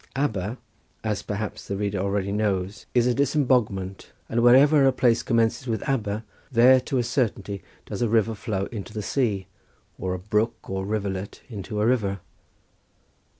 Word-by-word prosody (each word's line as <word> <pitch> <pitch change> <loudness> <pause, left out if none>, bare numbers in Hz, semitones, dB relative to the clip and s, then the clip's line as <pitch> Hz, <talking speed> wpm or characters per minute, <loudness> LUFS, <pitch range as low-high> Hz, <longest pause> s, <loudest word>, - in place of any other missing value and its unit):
Aber, 110 -5 -1 0.5
as 105 -2 -1
perhaps 105 0 -5
the 100 - -2
reader 100 -1 -1
already 100 0 -1
knows, 100 -1 -1
is 120 -1 +4
a 125 - +3
disemboguement, 125 -9 0 0.2
and 120 - +1
wherever 135 +5 +6
a - - +5
place 120 -2 +3
commences 115 +2 +1
with 115 +4 -2
Aber 110 -5 -1 0.3
there 130 +2 +7
to 130 +1 -2
a 125 - +2
certainty 115 -5 -1 0.2
does - - -5
a 120 - +2
river 115 0 +2
flow 100 -2 -2
into 105 -4 -7
the 105 - -3
sea 105 -6 0 0.5
or 95 0 -2
a - - -3
brook 105 +4 -1
or 95 0 -3
rivulet 100 -2 -3
into 105 -1 -5
a 105 - +2
river. 105 -5 +1
110 Hz, 160 wpm, -25 LUFS, 100-120 Hz, 0.5 s, there